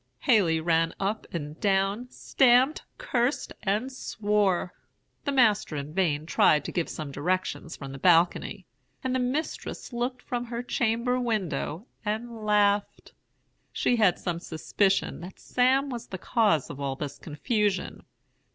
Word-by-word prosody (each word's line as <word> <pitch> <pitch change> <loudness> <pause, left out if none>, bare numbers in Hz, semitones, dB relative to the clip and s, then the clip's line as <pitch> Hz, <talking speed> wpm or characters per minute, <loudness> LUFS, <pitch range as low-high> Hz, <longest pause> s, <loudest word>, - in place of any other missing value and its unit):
"Haley 195 - +3
ran 165 0 +1
up 205 +3 -2
and 150 -2 -5
down, 200 +4 +1
stamped, 260 +3 +3 0.2
cursed, 270 - -1
and 215 +6 -1
swore. 205 -7 0 0.5
The 285 - 0
master 220 - +3
in 145 +1 -5
vain 160 -5 +1
tried 150 -2 +3
to - - -4
give 170 -3 -1
some 150 -3 -6
directions 165 +2 -2
from 135 -1 -8
the 135 - -8
balcony, 175 +2 +3 0.4
and 260 -1 -1
the 260 - +1
mistress 255 +1 -3
looked 250 +1 -3
from 245 -1 -3
her 235 0 -4
chamber 240 +1 0
window 195 - -2 0.2
and 225 +1 -4
laughed. 205 -1 +1 0.6
She 245 - +1
had 200 -6 +4
some 170 -2 -3
suspicion 185 +3 0
that 180 +2 -9
Sam 265 +2 +2
was 240 -2 -6
the 190 - -6
cause 200 - +1
of 140 - -9
all 135 -1 -2
this 140 0 -6
confusion. 200 - -1
205 Hz, 140 wpm, -27 LUFS, 165-240 Hz, 0.6 s, had